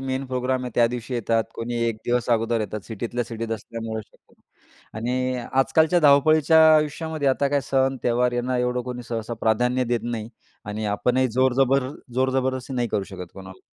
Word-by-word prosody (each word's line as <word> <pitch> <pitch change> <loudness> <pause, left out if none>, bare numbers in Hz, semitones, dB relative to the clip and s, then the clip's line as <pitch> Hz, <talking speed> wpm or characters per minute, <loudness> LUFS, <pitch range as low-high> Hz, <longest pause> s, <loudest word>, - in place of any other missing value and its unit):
Main 135 0 -3
program 130 0 -1
आहे 125 - -4
त्या 120 - +5
दिवशी 125 +1 -5
येतात. 115 -1 +1
कोणी 120 +1 -4
एक 115 -2 -1
दिवस 120 0 0
अगोदर 115 0 +1
येतात, 105 0 -4
सिटीतल्या 120 +2 -3
सिटीत 115 0 -6
असल्यामुळे 110 0 -5
शक्यतो. - - -29 0.6
आणि 125 +2 -1 0.2
आजकालच्या 160 +6 +3
धावपळीच्या 155 +2 +5 0.2
आयुष्यामध्ये, 155 -1 -1
आता 140 +1 +1
काय 145 0 +1
सण-त्योहार 125 -2 +1
यांना 125 +1 -1
एवढं 125 0 0
कोणी 125 0 -6
सहसा 115 0 -3
प्राधान्य 125 +3 +1
देत 120 -1 0
नाही 115 -2 -4 0.4
आणि 105 +1 -4
आपणही 130 +1 +1
जोर-जबर 130 +2 +2 0.3
जोर-जबरदस्ती 130 0 0
नाही 120 -2 0
करू 100 - -1
शकत 90 -2 -9
कोणाला. 95 -1 -11
125 Hz, 160 wpm, -24 LUFS, 115-130 Hz, 0.6 s, त्या